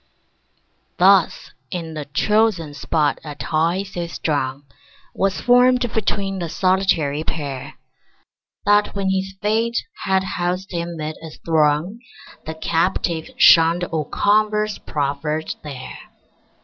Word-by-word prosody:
Thus 190 Hz, -1 st, +4 dB, 0.2 s
in 165 Hz, -3 st, -5 dB
the 150 Hz, -2 st, -5 dB
chosen 190 Hz, 0 st, +1 dB
spot 150 Hz, 0 st, 0 dB
a 150 Hz, -2 st, -7 dB
tie 165 Hz, +6 st, 0 dB
so 175 Hz, -3 st, -5 dB
strong 140 Hz, -4 st, -2 dB, 0.5 s
Was 195 Hz, -1 st, 0 dB
formed 245 Hz, -1 st, +4 dB
between 195 Hz, -3 st, -1 dB
the 170 Hz, -2 st, -3 dB
solitary 185 Hz, -6 st, +1 dB
pair, 140 Hz, -5 st, -5 dB, 0.9 s
That 205 Hz, 0 st, +3 dB
when 195 Hz, -1 st, 0 dB
his 190 Hz, 0 st, -2 dB
fate 225 Hz, +3 st, +1 dB, 0.3 s
had 190 Hz, -1 st, +2 dB
housed 180 Hz, +1 st, -3 dB
him 170 Hz, -1 st, -4 dB
'mid 155 Hz, 0 st, -5 dB
a 160 Hz, -, -8 dB, 0.2 s
throng 160 Hz, +5 st, +1 dB, 0.5 s
The 160 Hz, -, -4 dB
Captive 165 Hz, 0 st, -1 dB
shunned 165 Hz, +1 st, +6 dB
all 160 Hz, -3 st, -2 dB
converse 210 Hz, +2 st, +1 dB
proffered 150 Hz, +2 st, -2 dB
there. 135 Hz, -4 st, -8 dB
175 Hz, 115 wpm, -21 LUFS, 155-195 Hz, 0.9 s, shunned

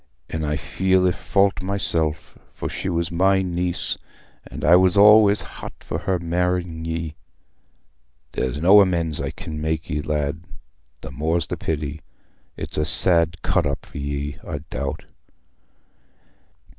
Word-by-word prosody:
An' 80 Hz, 0 st, -3 dB
I 75 Hz, 0 st, -1 dB
feel 95 Hz, +6 st, +1 dB
i' -, -, +3 dB
fault 100 Hz, +2 st, +1 dB
myself, 85 Hz, -5 st, -1 dB, 0.2 s
for -, -, -4 dB
she -, -, -4 dB
was 85 Hz, -1 st, -2 dB
my 95 Hz, +2 st, +2 dB
niece, 90 Hz, -1 st, -1 dB, 0.5 s
and -, -, -6 dB
I 85 Hz, -, +7 dB
was 95 Hz, +1 st, +4 dB
allays 105 Hz, 0 st, +6 dB
hot -, -, -9 dB
for -, -, -4 dB
her 95 Hz, -1 st, -1 dB
marr'ing 85 Hz, -1 st, -2 dB
ye. 80 Hz, -1 st, -4 dB, 1.2 s
There's 65 Hz, +3 st, -2 dB
no 95 Hz, +6 st, +7 dB
amends 85 Hz, -5 st, 0 dB
I -, -, -3 dB
can 75 Hz, -1 st, -7 dB
make 80 Hz, +1 st, -3 dB
ye, 75 Hz, -1 st, -1 dB
lad—the 70 Hz, -4 st, -6 dB
more's 80 Hz, +2 st, -1 dB
the -, -, -4 dB
pity: 75 Hz, 0 st, -4 dB, 0.6 s
it's -, -, -5 dB
a 75 Hz, -, +1 dB
sad 85 Hz, 0 st, +5 dB
cut 90 Hz, -5 st, +1 dB
up 70 Hz, -, -4 dB
for -, -, -9 dB
ye, 70 Hz, +1 st, -4 dB
I 75 Hz, -3 st, -5 dB
doubt." 70 Hz, 0 st, -4 dB
85 Hz, 145 wpm, -22 LUFS, 75-90 Hz, 1.2 s, I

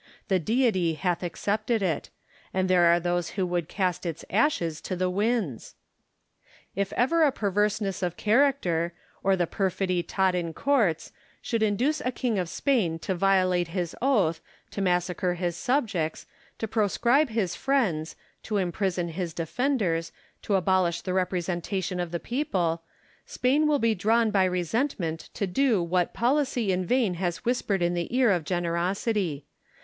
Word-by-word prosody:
The 190 Hz, -2 st, +3 dB
Deity 190 Hz, -, +1 dB
hath 180 Hz, +1 st, -1 dB
accepted 210 Hz, +5 st, -1 dB
it: 165 Hz, -6 st, -1 dB, 0.5 s
and 185 Hz, 0 st, +1 dB
there 180 Hz, -2 st, +4 dB
are 170 Hz, 0 st, +5 dB
those 175 Hz, 0 st, -1 dB
who 190 Hz, -, +1 dB
would 175 Hz, -2 st, -2 dB
cast 185 Hz, -3 st, -1 dB
its 165 Hz, -3 st, -5 dB
ashes 180 Hz, -, +1 dB
to 185 Hz, -, -4 dB
the 180 Hz, 0 st, 0 dB
winds! 205 Hz, -, -1 dB, 1.0 s
If 200 Hz, +1 st, -1 dB
ever 325 Hz, +7 st, +2 dB
a 300 Hz, -3 st, +5 dB
perverseness 205 Hz, -2 st, 0 dB
of 175 Hz, -2 st, -2 dB
character, 210 Hz, -, +2 dB, 0.3 s
or 195 Hz, 0 st, +3 dB
the 180 Hz, -2 st, +1 dB
perfidy 185 Hz, 0 st, -1 dB
taught 190 Hz, +2 st, +1 dB
in 170 Hz, -2 st, -2 dB
courts, 230 Hz, -, +1 dB, 0.3 s
should 230 Hz, -2 st, -2 dB
induce 245 Hz, +9 st, +1 dB
a 250 Hz, -, -1 dB
king 235 Hz, -4 st, -1 dB
of 180 Hz, -2 st, -2 dB
Spain 215 Hz, -, +1 dB
to 190 Hz, -, -3 dB
violate 185 Hz, -1 st, +2 dB
his 170 Hz, -1 st, -3 dB
oath, 205 Hz, -12 st, +2 dB, 0.3 s
to 200 Hz, -, -4 dB
massacre 180 Hz, 0 st, 0 dB
his 175 Hz, -1 st, -2 dB
subjects, 195 Hz, -, -1 dB, 0.3 s
to 225 Hz, -, -3 dB
proscribe 235 Hz, +7 st, +2 dB
his 220 Hz, -6 st, -1 dB
friends, 195 Hz, -, 0 dB, 0.3 s
to 215 Hz, -, -2 dB
imprison 180 Hz, -1 st, -1 dB
his 170 Hz, -1 st, -4 dB
defenders, 175 Hz, -, -1 dB, 0.3 s
to 205 Hz, -, 0 dB
abolish 185 Hz, -2 st, +2 dB
the 185 Hz, -, -3 dB
representation 180 Hz, 0 st, -1 dB
of 175 Hz, -1 st, -2 dB
the 170 Hz, +1 st, -3 dB
people, 185 Hz, -, -1 dB, 0.5 s
Spain 280 Hz, +5 st, +2 dB
will 300 Hz, -1 st, +3 dB
be 230 Hz, -4 st, +2 dB
drawn 220 Hz, +3 st, +2 dB
by 195 Hz, -2 st, +3 dB
resentment 180 Hz, -, -1 dB
to 200 Hz, -, -1 dB
do 225 Hz, +3 st, +2 dB
what 175 Hz, +1 st, 0 dB
policy 250 Hz, -4 st, +1 dB
in 180 Hz, -1 st, -1 dB
vain 240 Hz, -6 st, +2 dB
has 175 Hz, -1 st, -3 dB
whispered 210 Hz, -6 st, 0 dB
in 175 Hz, 0 st, +1 dB
the 175 Hz, -1 st, -2 dB
ear 250 Hz, -5 st, +5 dB
of 175 Hz, -4 st, +1 dB
generosity. 175 Hz, -, -1 dB
190 Hz, 155 wpm, -27 LUFS, 175-225 Hz, 1.0 s, are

